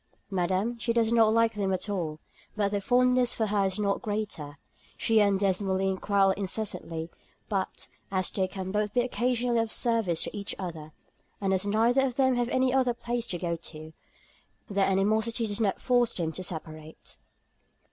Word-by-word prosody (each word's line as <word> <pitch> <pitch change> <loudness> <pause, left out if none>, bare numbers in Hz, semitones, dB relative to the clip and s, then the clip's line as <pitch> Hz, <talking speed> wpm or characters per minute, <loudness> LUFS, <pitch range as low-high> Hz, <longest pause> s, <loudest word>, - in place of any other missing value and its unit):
"Madam, 190 +6 0
she 230 0 0
does 230 -1 +2
not 225 -2 +5
like 230 0 +3
them 200 -2 -1
at 185 +1 -1
all; 165 -7 -3 0.4
but 205 -2 +1
their 205 -1 -1
fondness 250 +2 +3
for 220 - 0
her 205 -1 +1
is 190 -1 -1
not 200 -1 0
greater. 205 - -4 0.4
She 225 -1 +3
and 200 -2 +3
Desmoulins 190 -1 +1
quarrel 200 -1 +3
incessantly; 190 -4 -3 0.4
but 195 -3 -3 0.2
as 185 -1 0
they 190 -2 0
can 190 0 -5
both 210 +2 -1
be 245 - +4
occasionally 245 -1 0
of 225 -1 -1
service 225 -9 +1
to - - -4
each 200 -1 -3
other, 165 -5 -6 0.5
and 195 -1 0
as 190 +2 +1
neither 230 +5 +3
of 255 -3 -1
them 260 -1 +3
have 245 0 0
any 255 0 +2
other 255 -3 +2
place 240 0 -3
to 175 - -2
go 170 -1 -2
to, 155 -1 -10 0.7
their 200 -1 +1
animosity 220 +4 +1
does 210 +1 -2
not 200 -3 +1
force 245 -2 +2
them 165 -3 -2
to 185 - -7
separate." 155 -3 -7
205 Hz, 175 wpm, -28 LUFS, 185-230 Hz, 0.7 s, not